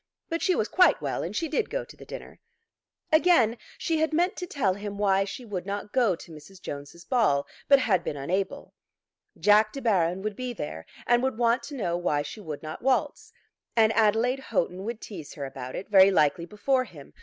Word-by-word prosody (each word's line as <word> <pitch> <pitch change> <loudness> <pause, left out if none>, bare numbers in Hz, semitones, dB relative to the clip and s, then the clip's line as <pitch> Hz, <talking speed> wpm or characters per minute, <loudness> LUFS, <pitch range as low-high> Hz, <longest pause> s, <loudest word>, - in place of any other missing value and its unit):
But 330 -1 -2
she 370 -1 +2
was 215 - 0
quite 365 0 +4
well, - - -2
and - - -5
she 335 -2 0
did 320 +8 -1
go - - -3
to - - -14
the - - -14
dinner. - - -9 0.7
Again 315 -8 +5 0.2
she 325 - 0
had 315 0 +1
meant 355 +5 +2
to 360 - -4
tell 230 - +1
him 205 +1 -6
why 195 -1 +2
she 240 +5 -7
would 195 -4 -5
not 205 +1 -4
go 235 -8 +3
to 165 - -13
Mrs. 160 +5 -13
Jones's 145 +2 -8
ball, 205 - +2 0.2
but 280 - +7
had 215 -8 +1
been 145 - -4
unable. 185 +8 -3 0.7
Jack 215 +1 +5
De 275 - -6
Baron 190 -6 +1
would 215 -1 -3
be 250 +1 -4
there, 115 - -6 0.2
and 240 0 +3
would 265 -3 -1
want 235 +1 +2
to 285 - -8
know 175 -9 -1
why 150 -5 0
she 145 +9 -8
would 155 -6 -7
not 155 0 -7
waltz. 290 - 0 0.4
And 225 -1 +4
Adelaide 225 +4 +2
Houghton 190 -6 -2
would 230 0 -5
tease 170 -9 -9
her 140 - -5
about 130 -1 -7
it, 195 - -5
very 195 -2 +7
likely 170 -2 +2
before 255 +7 0
him. 150 - -14
210 Hz, 210 wpm, -27 LUFS, 175-255 Hz, 0.7 s, but